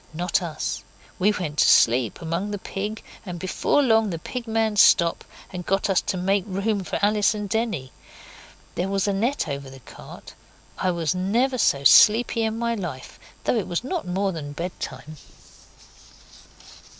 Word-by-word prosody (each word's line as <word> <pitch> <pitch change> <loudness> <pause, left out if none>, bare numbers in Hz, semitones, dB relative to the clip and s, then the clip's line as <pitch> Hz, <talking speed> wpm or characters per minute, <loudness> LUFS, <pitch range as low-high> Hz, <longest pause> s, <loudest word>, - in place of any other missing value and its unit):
Not 180 +3 0
us. 170 -3 -4 0.4
We 205 +3 +4
went 155 -7 -4
to - - +5
sleep, 120 - +3
among 170 +5 -2
the 205 - -3
pig, 205 +2 -5 0.2
and 180 -4 -6
before 185 - +1
long 225 -4 +3
the 170 - -3
Pig 240 +8 -6
man 220 -1 0
stopped 170 -4 +4 0.3
and 180 -1 -5
got 195 +2 0
us 190 - +3
to 185 - -3
make 195 +2 +1
room 200 +1 -1
for 155 - -3
Alice 210 +1 +3
and 210 -1 -4
Denny. 215 - -2 0.8
There 180 - -2
was 195 0 0
a 200 - +1
net 230 +3 -1
over 140 -2 -5
the 135 0 -12
cart. - - -12 0.5
I 185 - +1
never 185 - 0
was 250 - 0
so 140 0 +2
sleepy 230 - +6
in 220 0 -1
my 235 0 -1
life, 175 - -7 0.2
though - - +1
it 210 - -2
was 175 +6 -2
not 330 - -4
more 190 +2 -1
than 145 -4 -6
bedtime. 155 -3 -7
195 Hz, 170 wpm, -24 LUFS, 170-220 Hz, 0.8 s, sleepy